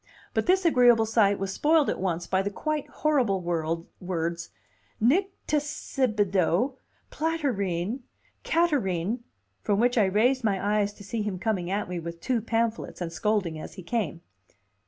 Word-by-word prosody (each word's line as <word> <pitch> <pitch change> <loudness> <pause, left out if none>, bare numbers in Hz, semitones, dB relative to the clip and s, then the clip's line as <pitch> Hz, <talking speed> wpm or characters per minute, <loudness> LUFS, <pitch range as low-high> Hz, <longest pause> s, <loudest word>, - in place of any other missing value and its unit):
But - - 0
this 375 0 +3
agreeable 245 -7 +5
sight 210 -3 +3
was 195 0 -3
spoiled 305 +5 +3
at - - -1
once 175 -2 -1
by 190 +2 +1
the 200 - -1
quite 305 +7 -3
horrible 255 -11 +1
words 170 0 -3 0.5
Nycticebidoe, 260 - +1 0.4
platyrrhine, 240 - -1 0.4
catarrhine, 240 - +1 0.4
from 205 -1 +1
which 245 +1 +3
I 210 - +5
raised 235 +7 +2
my 205 0 +1
eyes 205 0 +1
to 205 - -13
see 215 +3 -3
him 205 -3 -2
coming 185 -3 -1
at 200 +2 -1
me 180 -1 -4
with 170 0 -7
two 240 +5 0
pamphlets, 230 0 -1
and 170 -2 -4
scolding 190 -5 0
as - - -8
he 185 - -9
came. 185 -3 -2
210 Hz, 145 wpm, -27 LUFS, 180-255 Hz, 0.5 s, agreeable